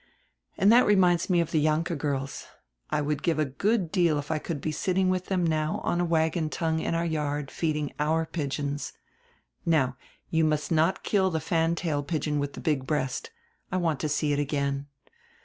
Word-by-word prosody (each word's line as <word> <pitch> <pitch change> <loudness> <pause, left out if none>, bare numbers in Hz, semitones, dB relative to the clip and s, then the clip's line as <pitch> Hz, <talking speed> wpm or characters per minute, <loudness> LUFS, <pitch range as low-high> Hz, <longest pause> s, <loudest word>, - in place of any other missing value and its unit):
And 195 +3 +5
that 240 +2 +6
reminds 180 -4 +4
me 175 -2 +4
of 170 - -3
die 155 - +2
Jahnke 155 +3 +1
girls. 140 -2 -3 0.4
I 150 - 0
would 150 0 -1
give 165 -3 +1
a 155 - +2
good 185 - 0
deal 170 -6 +3
if 145 +1 -4
I 155 - 0
could 155 -1 -4
be 155 - -2
sitting 185 +4 +1
with 185 0 -1
them 175 -4 +1
on 155 +3 0
a - - +1
wagon 160 -1 +1
tongue 160 0 -1
in 165 - -1
our 170 +1 0
yard 150 -3 -1
and 135 - -13
feeding 150 -3 -1
our 160 +2 +1
pigeons. 145 -2 -3 0.7
Now, 135 -6 +2 0.4
you 160 0 +3
must 155 +1 0
not 165 +3 +2
kill 190 -2 +2
die 165 - -1
fan 165 +2 +1
tail 160 -4 -1
pigeon 150 -1 -1
widi 145 0 -3
die - - -8
big 140 -4 0
breast; 135 -4 -1 0.4
I 185 - 0
want 165 -6 0
to 155 - -1
see 150 0 +1
it 145 - 0
again. 140 -1 -1
155 Hz, 200 wpm, -27 LUFS, 145-170 Hz, 0.7 s, that